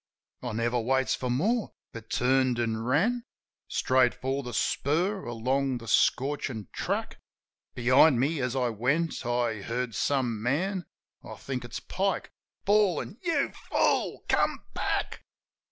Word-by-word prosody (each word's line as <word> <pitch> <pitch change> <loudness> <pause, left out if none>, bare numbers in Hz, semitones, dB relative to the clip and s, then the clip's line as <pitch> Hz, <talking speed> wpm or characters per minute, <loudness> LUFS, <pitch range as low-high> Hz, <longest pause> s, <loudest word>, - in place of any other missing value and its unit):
I 120 -3 -4
never 120 +2 0
waits 130 +3 +1
for 125 - -2
more; 205 - 0 0.2
but 115 -1 -9
turned 130 0 +2
an' 115 -2 0
ran 195 - +1 0.4
Straight 130 -1 +2
for 135 +2 -2
the 125 -2 -6
spur, 180 - 0
along 130 +3 0
the 115 -1 -10
scorchin' 130 -4 +1
track. - - -3 0.6
Behind 130 +2 +5
me, 145 +3 +1
as 125 0 -1
I 125 -2 +1
went, 135 +9 0
I 120 -3 0
hear 120 +3 -2
some 120 0 0
man 175 - -1 0.2
— - - -48
I - - -8
think 130 -3 -5
it's 120 - -6
Pike 195 +1 -2 0.2
— - - -53
bawlin', 205 -1 +2
"You 330 -6 +1 0.2
fool! - - +1
Come - - +1
back!" - - -2
130 Hz, 140 wpm, -28 LUFS, 120-160 Hz, 0.6 s, Behind